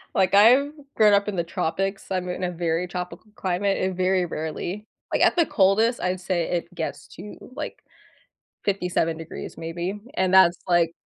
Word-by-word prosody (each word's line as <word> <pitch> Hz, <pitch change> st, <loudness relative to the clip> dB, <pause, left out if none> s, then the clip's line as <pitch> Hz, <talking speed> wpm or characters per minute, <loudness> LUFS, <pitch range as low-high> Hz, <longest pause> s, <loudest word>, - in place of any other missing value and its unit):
Like, 190 Hz, 0 st, +2 dB
I've 245 Hz, +8 st, +6 dB, 0.2 s
grown 215 Hz, -2 st, +5 dB
up 200 Hz, 0 st, +3 dB
in 205 Hz, -, -4 dB
the 170 Hz, -, 0 dB
tropics, 195 Hz, +4 st, -2 dB
I'm 185 Hz, -1 st, -2 dB
in 180 Hz, +1 st, -4 dB
a 180 Hz, -, 0 dB
very 170 Hz, 0 st, -1 dB
tropical 180 Hz, +4 st, -7 dB
climate 195 Hz, +1 st, 0 dB
and 185 Hz, 0 st, -1 dB
very 185 Hz, 0 st, +1 dB
rarely 175 Hz, +6 st, -5 dB, 0.3 s
like, -, -, +1 dB
at -, -, +5 dB
the 340 Hz, -2 st, +4 dB
coldest, 220 Hz, +3 st, +2 dB
I'd 180 Hz, 0 st, -1 dB
say 180 Hz, -2 st, -1 dB
it 175 Hz, 0 st, -3 dB
gets -, -, -5 dB
to, 210 Hz, -, -10 dB, 0.2 s
like, -, -, -6 dB, 0.8 s
57 180 Hz, -4 st, 0 dB
degrees 165 Hz, 0 st, -8 dB
maybe, 170 Hz, +5 st, -4 dB, 0.2 s
and 185 Hz, 0 st, +1 dB
that's, 185 Hz, -2 st, +6 dB
like, 175 Hz, -2 st, +3 dB
185 Hz, 175 wpm, -24 LUFS, 175-200 Hz, 0.8 s, I've